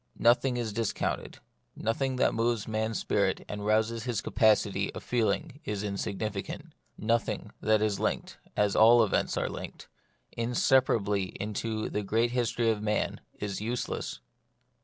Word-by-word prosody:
Nothing 125 +2 +3
is 115 -3 -2
disconnected; 115 -1 -2 0.4
nothing 130 +4 -1
that 125 - +2
moves 115 -1 0
man's 110 0 -1
spirit - - 0
and 105 0 -5
rouses 110 +2 +1
his 120 -5 -1
capacity 105 -3 +2
of - - -6
feeling 125 +5 0
is 105 -6 -3
insignificant; 100 0 -4 0.2
nothing 115 +2 -1
that 110 0 +3
is 105 -2 0
linked - - -2
— - - -27
as 105 -1 +2
all 115 +2 +7
events 105 - 0
are - - 0
linked - - -8 0.2
— - - -43
inseparably 115 -4 +2
into 110 +1 -2
the 105 - -2
great 115 +4 +1
history 120 -2 +1
of 105 -2 -2
man, 105 0 -1
is 100 -1 -4
useless. 115 - -3
110 Hz, 145 wpm, -29 LUFS, 105-120 Hz, 0.4 s, all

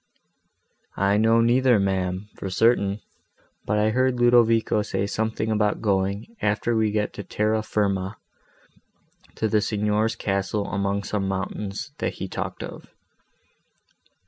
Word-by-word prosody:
"I 100 +1 +2
know 115 +2 +4
neither, 120 0 +4
ma'am, 95 0 -1
for 95 - -6
certain; 100 0 +2 0.7
but 105 - +1
I 105 +1 +2
heard 130 +1 +1
Ludovico 115 -3 +4
say 100 - -2
something 110 +1 -2
about 105 -1 +1
going, 100 - -1
after 105 +3 0
we 110 -1 +2
get 105 0 -1
to 100 - -7
Terra 110 +2 0
firma, 100 -2 -1 1.2
to 110 - 0
the 105 0 +2
signor's 105 +1 0
castle 100 -1 -1
among 100 0 -1
some 100 -1 -2
mountains, 100 +4 -4
that - - -1
he - - -5
talked - - -5
of." - - -9
105 Hz, 130 wpm, -24 LUFS, 100-110 Hz, 1.2 s, know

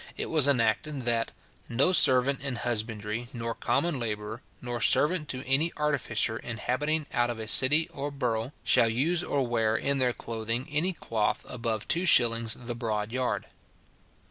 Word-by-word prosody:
it - - -3
was 155 -4 +4
enacted, 140 +2 +1
that 115 -1 0 0.4
"no 135 +10 +2
servant 135 -3 +4
in 140 -2 -3
husbandry 110 -1 -3
nor 115 -1 -3
common 170 +4 0
labourer, 110 0 -4 0.2
nor 120 -1 -5
servant 150 +3 +3
to 130 +1 -4
any 140 +6 +2
artificer 135 -7 0
inhabiting 145 +7 -2
out 120 -2 +1
of 120 - -4
a 110 - -6
city 150 +7 +5
or 140 +1 -5
burgh, 125 -3 -2
shall 120 -3 +4
use 160 +10 0
or 140 -5 -1
wear 115 -2 0
in 140 +4 0
their 125 -1 +2
clothing 115 +2 -4
any 155 +6 0
cloth 115 - -2
above 115 -3 -4
two 175 +3 +1
shillings 115 -6 +4
the 120 -1 -6
broad 110 -2 -3
yard." 130 0 -2
125 Hz, 160 wpm, -27 LUFS, 115-140 Hz, 0.4 s, city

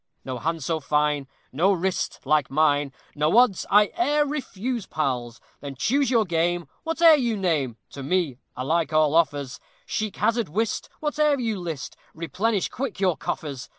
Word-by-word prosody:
No 130 -2 -4
hand 165 +3 -2
so 160 +1 -1
fine, 150 -1 0 0.2
No 170 +9 +3
wrist 185 0 -2
like 150 0 +2
mine, 145 -1 +2 0.2
No 155 +7 +2
odds 240 -6 +4
I 210 +1 +5
e'er 295 -3 +3
refuse, 255 -6 -4
pals. 125 -5 -2 0.2
Then 140 -1 -7
choose 275 - +1
your 230 -4 +3
game; 170 -1 0 0.2
whate'er 325 0 +5
you 235 -5 0
name, 150 - 0
To 140 - -8
me 150 -3 -1 0.2
alike 160 +6 0
all 155 -1 +3
offers; 145 -5 +1 0.3
Chic 215 -7 -3
hazard, 230 -5 0
whist, 215 +7 -2
whate'er 300 -1 +2
you 225 -5 -2
list, 165 -6 -5 0.2
Replenish 195 +5 -1
quick 250 -6 -5
your 185 -4 +2
coffers. 140 -5 -5
170 Hz, 155 wpm, -24 LUFS, 145-225 Hz, 0.3 s, I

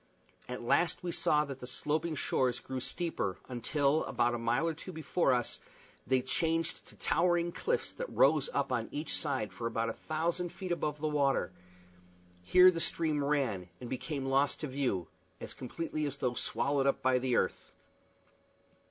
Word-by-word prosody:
At 125 -1 -5
last 170 +10 +2
we 175 - -2
saw 150 -2 +3
that 135 -2 -7
the 125 - -7
sloping 155 +5 -1
shores 130 -2 +1
grew 130 -1 -5
steeper, 145 - -2
until, 140 +4 +1
about 120 0 +1
a 120 - -2
mile 120 +8 +1
or 165 - 0
two 165 +4 -8
before 160 -2 +1
us, 120 -2 0 0.5
they 130 0 +2
changed 165 +5 0
to - - -15
towering 175 -1 +2
cliffs 480 - -1
that - - -5
rose - - +4
up - - -1
on - - -1
each 150 +2 -2
side 130 -8 -1
for 115 - -3
about 115 0 -1
a - - -2 0.2
thousand 170 +3 0
feet 185 0 -6
above 150 -3 -1
the 155 - -1
water; 140 -10 +1 0.9
here 180 - +7
the 165 - -3
stream 155 -3 0
ran, 130 -11 0
and 120 - -8
became 135 +2 -3
lost 135 +1 +2
to 150 - -2
view 130 - -1 0.3
as - - -7
completely 155 +3 -3
as 140 0 -5
though 125 -3 0
swallowed 140 +2 0
up 135 - +1
by 130 -1 +4
the 125 -1 0
earth. - - -1
140 Hz, 175 wpm, -32 LUFS, 125-165 Hz, 0.9 s, here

